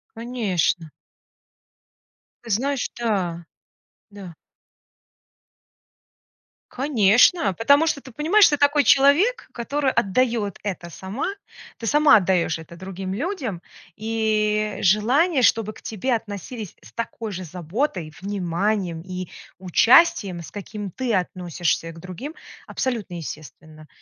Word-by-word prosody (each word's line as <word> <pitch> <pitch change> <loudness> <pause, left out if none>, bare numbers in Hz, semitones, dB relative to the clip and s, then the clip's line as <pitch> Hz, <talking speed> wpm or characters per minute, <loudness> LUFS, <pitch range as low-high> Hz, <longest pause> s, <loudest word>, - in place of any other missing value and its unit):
Конечно. 200 -9 -1 1.5
Ты 230 - -11
знаешь, 265 +5 0
да. 185 -8 -2 0.7
Да. 195 -5 -10 2.4
Конечно! 245 - +3
Потому 280 - +4
что 300 - 0
ты 265 - -13
понимаешь, 335 - +5
ты 290 - +2
такой 285 +1 +3
человек, 320 - +4
который 275 +3 -1
отдает 230 -2 0
это 180 -4 -5
сама. 190 - -5 0.5
Ты 230 - -5
сама 295 +3 +6
отдаешь 180 -4 +1
это 160 +1 -12
другим 190 +1 -6
людям, 255 - -4 0.3
и 215 -1 0
желание, 255 - +3
чтобы 225 -3 +2
к - - -16
тебе 225 +4 -2
относились 215 -1 -5
с - - -16
такой 230 -1 -5
же 185 -1 -5
заботой, 180 - -3
вниманием 190 -2 -1
и 185 0 -6 0.3
участием, 190 - +4
с 165 - -11
каким 205 -1 -7
ты 245 +2 -1
относишься 175 -2 -2
к 165 - -13
другим, 185 - -8 0.3
абсолютно 230 -8 -3
естественно. 155 -1 -9
210 Hz, 110 wpm, -23 LUFS, 180-255 Hz, 2.4 s, сама